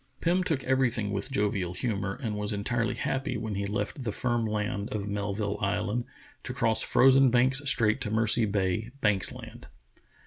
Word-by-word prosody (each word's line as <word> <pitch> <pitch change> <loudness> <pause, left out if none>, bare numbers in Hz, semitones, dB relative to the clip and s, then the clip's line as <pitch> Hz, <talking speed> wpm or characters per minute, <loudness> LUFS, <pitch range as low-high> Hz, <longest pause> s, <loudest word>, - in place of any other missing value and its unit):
Pim 180 +2 +1
took 160 -7 -1
everything 125 -5 +1
with 100 -1 -3
jovial 100 -4 -1
humor, 100 -2 -2
and 110 -3 -2
was 105 +1 -2
entirely 115 +2 -1
happy 135 0 -2
when 110 -2 -4
he 100 0 -2
left 110 +6 -3
the 115 - -2
firm 120 +1 0
land 105 -1 -2
of 105 -1 -3
Melville 100 0 -3
Island 105 +4 -1 0.4
to - - -6
cross 110 -1 +2
frozen 135 +1 +5
Banks 130 +3 +3
Strait 110 -5 +2
to - - -2
Mercy 110 +1 +4
Bay, 100 +2 -1
Banks 100 -3 +2
Land. - - -11
110 Hz, 170 wpm, -28 LUFS, 100-120 Hz, 0.4 s, frozen